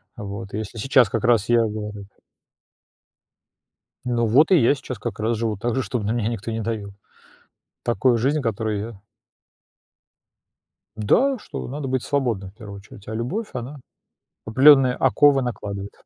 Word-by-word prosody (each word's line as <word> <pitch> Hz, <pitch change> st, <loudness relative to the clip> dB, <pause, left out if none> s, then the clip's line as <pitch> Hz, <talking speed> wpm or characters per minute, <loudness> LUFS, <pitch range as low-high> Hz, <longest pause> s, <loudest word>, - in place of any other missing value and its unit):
вот. 100 Hz, -4 st, -7 dB
И -, -, -2 dB
если 110 Hz, +1 st, -6 dB
сейчас 125 Hz, -1 st, +3 dB
как -, -, -2 dB
раз 115 Hz, -3 st, +2 dB
я 120 Hz, -1 st, +5 dB
говорю 105 Hz, -2 st, -5 dB, 2.0 s
Ну 120 Hz, -1 st, 0 dB
вот, 140 Hz, -, +4 dB
и 185 Hz, -, +7 dB
я 120 Hz, +3 st, +4 dB
сейчас 130 Hz, -4 st, -7 dB
как 105 Hz, -1 st, -5 dB
раз 115 Hz, +1 st, 0 dB
живу 110 Hz, -2 st, -2 dB
так 120 Hz, +3 st, -2 dB
же, 130 Hz, -, +1 dB
чтобы 105 Hz, +1 st, -3 dB
на 110 Hz, -, 0 dB
меня 115 Hz, -2 st, -1 dB
никто 115 Hz, -1 st, -4 dB
не 115 Hz, 0 st, -3 dB
давил. 105 Hz, -3 st, -4 dB, 0.9 s
Такую 120 Hz, 0 st, +2 dB
жизнь, 140 Hz, +6 st, +1 dB
которую 110 Hz, -2 st, -2 dB
я 105 Hz, -2 st, -7 dB, 2.0 s
Да, 255 Hz, -, +2 dB
что -, -, -7 dB
надо 140 Hz, +1 st, -5 dB
быть 130 Hz, -1 st, -1 dB
свободным 120 Hz, -9 st, -1 dB
в 95 Hz, -, -28 dB
первую 105 Hz, -3 st, -10 dB
очередь, 100 Hz, 0 st, -15 dB
а 110 Hz, -, -4 dB
любовь, 170 Hz, -, -3 dB
она 130 Hz, +3 st, -6 dB, 0.7 s
определённые 130 Hz, +2 st, +6 dB
оковы 135 Hz, +1 st, +4 dB
накладывает. 100 Hz, -5 st, -5 dB
115 Hz, 155 wpm, -22 LUFS, 105-130 Hz, 2.0 s, и